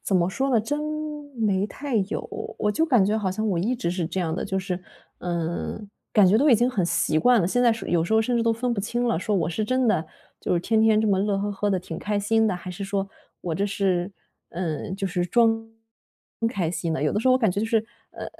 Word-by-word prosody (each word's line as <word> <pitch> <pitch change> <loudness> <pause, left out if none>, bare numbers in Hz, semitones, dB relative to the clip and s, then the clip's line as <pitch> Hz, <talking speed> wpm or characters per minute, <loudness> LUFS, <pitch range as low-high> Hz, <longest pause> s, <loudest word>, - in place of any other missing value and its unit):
怎 195 - -1
么 175 -1 +3
说 270 +8 -1
呢， 235 -4 +4
真， 290 +7 -2 0.6
没 205 -4 +1
太 275 +2 -4
有。 200 +1 -2 0.3
我 210 - +1
就 320 +10 +1
感 245 -9 +4
觉 210 +3 +1
好 195 -3 -1
像 215 +4 -2
我 180 -4 0
一 225 +8 0
直 235 -8 -2
是 175 -2 -2
这 185 +3 -3
样 160 -2 -1
的， - - -3
就 190 - -1
是， 185 -1 -4 0.4
呃， 170 +2 -3 0.3
感 210 -3 +6
觉 195 +4 +5
都 285 +5 +4
已 - - +8
经 240 +3 +3
很 205 -9 0
习 155 -2 +1
惯 245 +6 +5
了， 170 - +1
现 245 +6 +1
在 235 -2 +5
是 225 - -6
有 170 -2 +2
时 195 - -3
候 220 - +5
甚 240 +2 0
至 230 - +2
都 230 0 +3
分 240 +2 -1
不 - - -5
清 240 +4 -1
了。 230 - +1
说 205 +4 -1
我 170 -4 +1
是 195 +6 -2
真 255 +2 +1
的， 170 -7 +2 0.4
就 - - -1
是， 175 - +2
天 220 +4 +1
天 220 -1 +4
这 220 - +1
么 195 - +3
乐 200 0 +1
呵 205 +1 -1
呵 205 +1 -1
地 190 - +1
挺 170 -2 -7
开 210 0 -1
心 225 +2 +2
的。 200 - +1
还 180 +1 -7
是 195 +2 -5
说 195 0 -2 0.3
我 170 -3 -3
这 195 - 0
是 195 -2 0 0.4
呃， 170 -3 -3
就 195 +1 -2
是 180 -1 -1
装 225 +3 +2 0.8
开 180 -9 -1
心 170 -2 -2
的。 160 - -2
有 150 - +2
的 - - 0
时 225 - -2
候 255 - +6
我 255 - +4
感 220 -6 +2
觉 200 - -3
就 - - 0
是， 225 0 +3 0.3
呃， - - -7
200 Hz, 285 characters per minute, -25 LUFS, 180-225 Hz, 0.8 s, 已